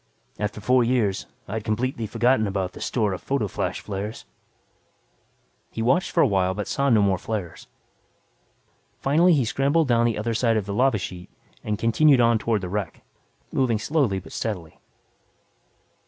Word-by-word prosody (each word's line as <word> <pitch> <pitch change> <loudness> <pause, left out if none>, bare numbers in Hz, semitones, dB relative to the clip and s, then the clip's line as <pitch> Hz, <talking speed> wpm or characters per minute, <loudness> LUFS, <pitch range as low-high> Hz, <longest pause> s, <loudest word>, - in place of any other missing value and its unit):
After 105 0 -3
four 125 +4 +3
years, 115 -5 0 0.2
I 100 - -6
had 110 -1 -3
completely 115 +1 -2
forgotten 115 0 +2
about 95 -2 -2
the - - -12
store 105 -5 0
of 90 - -6
photo 135 -6 -1
flash - - -3
flares. 105 +2 -6 1.4
He 115 - -4
watched 130 +10 +2
for 170 - +3
awhile 95 -6 +1
but 105 - -4
saw 140 0 0
no 110 -4 +4
more 95 -2 +1
flares. 100 -7 -5 1.3
Finally 165 +6 +3
he 135 -6 +2
scrambled 140 +6 +1
down 120 -1 +3
the 115 - -1
other 110 +2 -2
side 115 0 +2
of 105 - -2
the 100 - -4
lava 125 +1 +2
sheet 90 -2 -7 0.3
and 105 -1 -2
continued 125 +6 +4
on 115 -1 +4
toward 110 -1 0
the 90 - -5
wreck, 100 -3 -4 0.5
moving 125 -4 +1
slowly 130 -4 0
but 95 - -9
steadily. 90 -8 -5
110 Hz, 165 wpm, -24 LUFS, 100-130 Hz, 1.4 s, no